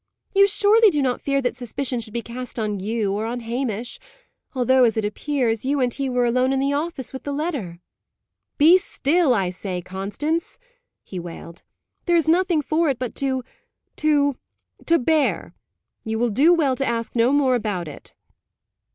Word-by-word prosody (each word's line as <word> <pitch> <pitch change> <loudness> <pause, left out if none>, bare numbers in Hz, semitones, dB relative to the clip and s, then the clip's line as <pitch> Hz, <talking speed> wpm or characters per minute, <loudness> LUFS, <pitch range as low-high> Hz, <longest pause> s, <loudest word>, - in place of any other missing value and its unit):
"You 395 0 +6
surely 420 +2 +5
do 300 -6 -1
not 255 -3 0
fear 275 -1 0
that 245 - -1
suspicion 250 +1 -3
should 220 -1 -5
be 235 -1 -3
cast 250 +1 -7
on 210 -3 -2
you, 210 0 -1
or 215 +2 -2
on 240 +1 -4
Hamish 235 0 -3 0.6
although, 260 0 +4
as 230 -2 +2
it 220 - 0
appears, 230 0 -1
you 280 +2 0
and 250 -2 +1
he 275 -1 -2
were 250 -1 +1
alone 255 +2 +2
in 270 - +1
the 275 +1 +1
office 290 -3 -3
with 265 - -6
the 285 - -5
letter?" 280 - -3 0.8
"Be 330 +5 +7
still, 325 -2 +1
I 190 -4 0
say, 180 0 -5
Constance," 205 - -3 0.5
he 185 - -7
wailed. 170 0 -9 0.4
"There 345 - +2
is 325 - +1
nothing 340 -2 +2
for 315 +2 +1
it 265 - 0
but 250 -2 -4
to 265 -2 -1 0.5
to 285 -3 +2 0.5
to 335 - +5
bear. 310 +2 0 0.5
You 220 0 -3
will 235 0 +1
do 285 +11 +4
well 300 -7 +3
to 275 - -1
ask 230 -3 -2
no 235 +2 +3
more 280 -2 +3
about 210 -8 -2
it." 150 - -11
255 Hz, 180 wpm, -22 LUFS, 225-295 Hz, 0.8 s, Be